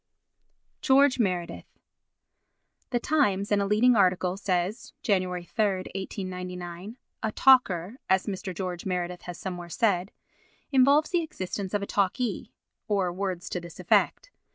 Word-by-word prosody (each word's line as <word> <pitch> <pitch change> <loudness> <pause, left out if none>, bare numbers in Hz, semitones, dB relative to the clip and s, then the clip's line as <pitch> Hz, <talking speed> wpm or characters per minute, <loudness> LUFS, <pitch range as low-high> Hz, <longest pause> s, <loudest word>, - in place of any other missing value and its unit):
George 270 0 +4
Meredith 180 -6 -2 1.1
The 245 -2 0
Times 205 -9 +1
in 205 -1 +3
a 200 - 0
leading 230 +4 +4
article 185 -2 +2
says 195 +3 -2
(Jany. 195 -7 +2
3, 180 - -4
1899) 185 0 -4 0.2
"a 220 - -1
talker," 220 -6 +4
as 190 0 +3
Mr. 195 -1 -4
George 180 -1 -4
Meredith 180 -1 -3
has 175 - -6
somewhere 175 -2 -6
said, 190 -1 +1 0.6
"involves 280 +5 +4
the 350 -2 +2
existence 195 - -4
of 205 - 0
a - - -1
talkee," 205 +5 -1 0.4
or 195 -4 0
words 185 -2 -3
to 180 - -2
this 170 -1 -11
effect. - - +1
195 Hz, 130 wpm, -27 LUFS, 180-225 Hz, 1.1 s, George